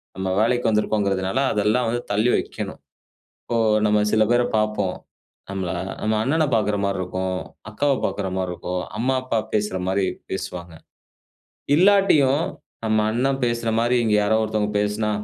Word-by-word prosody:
நம்ம 95 +1 -3
வேலைக்கு 120 +2 +2
வந்திருக்கோம்ங்கிறதுனால 100 -1 0
அதெல்லாம் 110 +3 +1
வந்து 120 +1 -1
தள்ளி 105 +4 +2
வைக்கணும். - - -4 0.6
இப்போ 120 - -3 0.3
நம்ம 105 0 +3
சில 110 - +4
பேர 120 0 +4
பார்ப்போம். 105 -3 0 0.5
நம்மள 95 -3 -3 0.3
நம்ம 110 0 +1
அண்ணனப் 145 +1 +1
பார்க்கிற 105 -2 +1
மாரி 100 -1 -1
இருக்கும், 95 0 -3 0.3
அக்காவ 140 +6 +1
பார்க்கிற 100 -2 -3
மாரி 90 -1 -2
இருக்கும். 90 +1 -4 0.2
அம்மா, 130 +4 +1
அப்பா 130 -3 -1
பேசுற 105 -3 0
மாரி, 95 0 +1 0.2
பேசுவாங்க. 90 -3 -5 1.0
இல்லாட்டியும் 170 -7 +4 0.4
நம்ம 110 -1 +2
அண்ணன் 135 +4 0
பேசுற 120 -1 -1
மாரி 120 +2 +2
இங்க 105 - +3
யாரோ 105 +2 +2
ஒருத்தவங்க 105 -1 -1
பேசினா, 105 +1 0
110 Hz, 140 wpm, -22 LUFS, 100-120 Hz, 1.0 s, சில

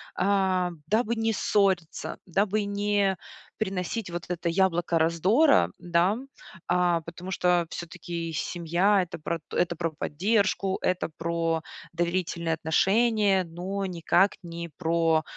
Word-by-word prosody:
а, 190 -2 +1 0.2
дабы 225 +2 +1
не 225 0 0
ссориться, 190 -5 0
дабы 200 +3 +1
не 200 -2 +1 0.4
приносить 190 0 -3
вот 170 0 -5
это 175 -1 -3
яблоко 175 -2 +2
раздора, 170 - +4
да. 175 +4 +2 0.5
А, 175 -2 +2
потому 175 +3 -8
что 175 -2 +2
всё-таки 170 -1 -5
семья- 175 +5 +1
это 170 -2 -6
про 165 +2 -3
это 175 -1 +1
про 165 0 -2
поддержку, 195 +5 0
это 185 -2 0
про 165 -1 -1 0.3
доверительные 170 -1 -1
отношения, 195 +5 +2
но 185 +4 -4
никак 180 +2 +2
не 170 0 -6
про 165 -2 +2
180 Hz, 115 wpm, -27 LUFS, 170-195 Hz, 0.5 s, раздора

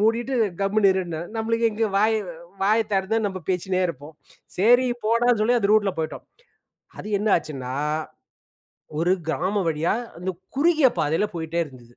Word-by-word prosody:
மூடிட்டு 235 +5 +1 0.3
கம்முனு 195 0 +3
இருன்னுனாரு. 175 -3 -3
நம்மளுக்கு 230 +1 +1
எங்கே 220 0 0
வாய 215 +2 +3 0.5
வாய 215 +3 +4
திறந்தா 195 +3 +1
நம்ம 190 -2 -4
பேசின்னே 185 +1 0
இருப்போம். 150 0 -8 0.4
சரி, 245 +6 +5 0.2
போடான்னு 235 +1 +3
சொல்லி 240 +3 +3
அந்த 205 -2 +1
ரூட்ல 205 -3 +3
போய்ட்டோம். 160 -1 -4 0.7
அது - - -7
என்ன 215 +2 -1
ஆச்சுன்னா, 135 -5 -5 1.2
ஒரு 170 +3 +2 0.2
கிராமம் 185 +3 0
வழியா 160 +1 0 0.2
அந்த 180 +2 -3 0.3
குறுகிய 310 -2 +4
பாதையில 160 +7 +1
போயிட்டே 165 +1 -2
இருந்தது. 125 -5 -15
195 Hz, 140 wpm, -24 LUFS, 165-225 Hz, 1.2 s, சரி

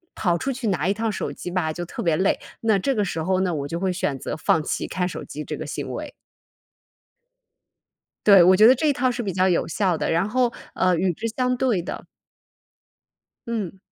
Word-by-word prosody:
跑 175 -3 +1
出 270 - -2
去 245 -3 -4
拿 180 -3 0
一 195 - +2
趟 225 +1 -1
手 - - -3
机 - - -7
吧， 175 -4 0
就 175 +2 -5
特 - - -6
别 165 -3 +2
累， 190 - +1 0.2
那 220 -3 +3
这 270 +8 0
个 210 - +1
时 165 -3 -3
候 185 +1 +1
呢， 180 -3 0
我 140 -2 -3
就 170 +2 -4
会 190 -1 0
选 150 -7 -2
择 - - -4
放 160 0 +2
弃 - - -2
看 180 -1 -1
手 180 - -6
机 150 - -7
这 - - -5
个 - - -6
行 - - -5
为。 - - -6 2.1
对， 200 -3 +8
我 185 +2 +6
觉 215 - +7
得 255 - +7
这 290 +5 -1
一 290 - +4
套 255 -1 +1
是 245 0 -4
比 200 -4 -3
较 185 +1 +2
有 175 - +1
效 180 -1 0
的， - - -1
然 170 +5 +1
后， 245 +1 +1 0.2
呃， 185 -1 +2
与 180 +1 +1
之 230 - -5
相 250 -1 +1
对 240 -9 +1
的 - - -6 1.4
嗯。 205 -5 -4
190 Hz, 235 characters per minute, -23 LUFS, 175-225 Hz, 2.1 s, 对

